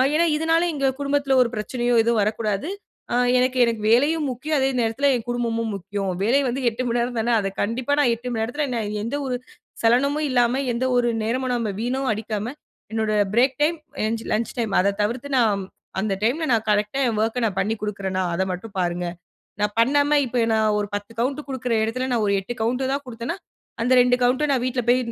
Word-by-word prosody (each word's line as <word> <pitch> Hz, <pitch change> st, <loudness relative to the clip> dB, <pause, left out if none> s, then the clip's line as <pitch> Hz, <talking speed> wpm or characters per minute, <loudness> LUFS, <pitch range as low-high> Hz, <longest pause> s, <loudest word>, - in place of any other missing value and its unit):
ஏன்னா 335 Hz, +2 st, +4 dB
இதனால, 325 Hz, +2 st, +2 dB
எங்க 275 Hz, -2 st, 0 dB
குடும்பத்தில 280 Hz, -1 st, +1 dB
ஒரு 245 Hz, -, +2 dB
பிரச்சனையோ 240 Hz, +3 st, -1 dB
எதுவும் 235 Hz, -1 st, +2 dB
வரக்கூடாது, 210 Hz, +2 st, -1 dB, 0.5 s
அ -, -, +2 dB, 0.2 s
எனக்கு, 255 Hz, +1 st, +1 dB
எனக்கு 230 Hz, -2 st, -2 dB
வேலையும் 295 Hz, +6 st, +3 dB
முக்கியம், 295 Hz, +5 st, -2 dB
அதே 265 Hz, 0 st, +2 dB
நேரத்தில 230 Hz, +5 st, +1 dB
என் 235 Hz, -2 st, -4 dB
குடும்பமும் 230 Hz, -2 st, -1 dB
முக்கியம். 195 Hz, +1 st, -4 dB
வேலை 240 Hz, +7 st, +3 dB
வந்து 255 Hz, +2 st, -2 dB
8:00 235 Hz, +2 st, -4 dB
மணி 240 Hz, 0 st, 0 dB
நேரம் 240 Hz, 0 st, -2 dB
தானே, 230 Hz, +2 st, 0 dB
அத 200 Hz, -, -1 dB
கண்டிப்பா 240 Hz, +6 st, -1 dB
நான் 265 Hz, -5 st, +4 dB
8:00 235 Hz, +2 st, -9 dB
மணி 225 Hz, -2 st, -1 dB
நேரத்தில 290 Hz, +7 st, -2 dB
என்ன 240 Hz, -2 st, -1 dB, 0.2 s
எந்த 230 Hz, +6 st, -3 dB
ஒரு 255 Hz, -2 st, -1 dB, 0.5 s
சலனமும் 280 Hz, +6 st, +3 dB
இல்லாம, 250 Hz, +1 st, +2 dB
எந்த 240 Hz, +2 st, -1 dB
ஒரு 240 Hz, -1 st, +2 dB
நேரமும் 250 Hz, +3 st, -1 dB
நம்ம 230 Hz, -3 st, -1 dB
வீண 250 Hz, +3 st, -1 dB
அடிக்காம 215 Hz, +2 st, -4 dB, 0.4 s
என்னோட 220 Hz, -1 st, 0 dB, 0.2 s
பிரேக் 255 Hz, +2 st, +3 dB
டைம், 330 Hz, +3 st, +2 dB, 0.3 s
எ -, -, +1 dB, 0.3 s
லன்ச் 225 Hz, +2 st, -1 dB
டைம், 220 Hz, -4 st, -1 dB
அத 200 Hz, +2 st, +1 dB
தவிர்த்து 240 Hz, +6 st, -3 dB
நான் 210 Hz, -5 st, +2 dB, 0.4 s
அந்த 205 Hz, -1 st, 0 dB
டைம் 245 Hz, +8 st, +2 dB
ல -, -, +1 dB
நான் 220 Hz, -1 st, +1 dB
கரெக்ட்டா 210 Hz, +5 st, 0 dB
என் 225 Hz, -3 st, -1 dB
ஒர்க்க 230 Hz, +2 st, 0 dB
நான் 200 Hz, -4 st, -2 dB
பண்ணி 205 Hz, +3 st, +1 dB
கொடுக்குறன்னா, 195 Hz, -3 st, -2 dB
அத 190 Hz, -, +1 dB
மட்டும் 195 Hz, +4 st, -7 dB
பாருங்க. 175 Hz, 0 st, -1 dB, 0.6 s
நான் 210 Hz, 0 st, 0 dB
பண்ணாம 285 Hz, +4 st, +3 dB
இப்ப 240 Hz, -1 st, +1 dB
நான் 215 Hz, -1 st, +2 dB
ஒரு 205 Hz, -, -1 dB
10 205 Hz, +2 st, -7 dB
கவுண்ட் 265 Hz, +4 st, 0 dB
கொடுக்குற 255 Hz, -3 st, -2 dB
இடத்துல, 255 Hz, +4 st, -2 dB
நான் 230 Hz, -3 st, +1 dB
ஒரு 200 Hz, -, +2 dB
8 195 Hz, +5 st, -6 dB
கவுண்ட் 250 Hz, +4 st, 0 dB
தான் 280 Hz, +1 st, -2 dB
கொடுத்தேனா, 245 Hz, +6 st, -5 dB, 0.5 s
அந்த 250 Hz, +2 st, +2 dB
2 245 Hz, 0 st, +4 dB
கவுன்ட்ட 255 Hz, +5 st, +3 dB
நான் 260 Hz, -3 st, +1 dB
வீட்ல 255 Hz, 0 st, 0 dB
போய் 245 Hz, +1 st, +5 dB
240 Hz, 200 wpm, -23 LUFS, 220-260 Hz, 0.6 s, போய்